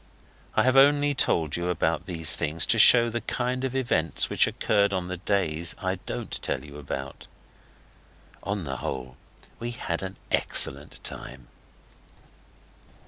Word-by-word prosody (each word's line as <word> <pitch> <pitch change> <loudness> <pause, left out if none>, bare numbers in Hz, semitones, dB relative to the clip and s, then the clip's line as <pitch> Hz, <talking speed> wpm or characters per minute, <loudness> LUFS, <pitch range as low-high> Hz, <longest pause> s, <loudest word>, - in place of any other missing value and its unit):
I - - +3
have 130 +1 +2
only 145 +1 +5
told 80 - +1
you 85 0 -2 0.3
these 80 -4 +4
things 75 +2 0
to - - +2
show 120 -1 +8
the 120 +1 -3
kind 125 +3 -3
of 130 -1 -3
events 85 - 0
which - - +3
occurred 100 -1 +1
on 90 -1 -3
the 90 - -4
days 85 -4 -1
I - - -3
don't - - -5
tell - - -3
you 75 0 -11
about. 70 -1 -7 1.1
On 100 -1 -3
the 65 -3 -5
whole, 65 -1 -6 0.4
we 120 - -4
had 100 -8 -4
an 95 0 -7
excellent - - 0
time. 65 -3 -7
90 Hz, 140 wpm, -26 LUFS, 75-120 Hz, 1.1 s, show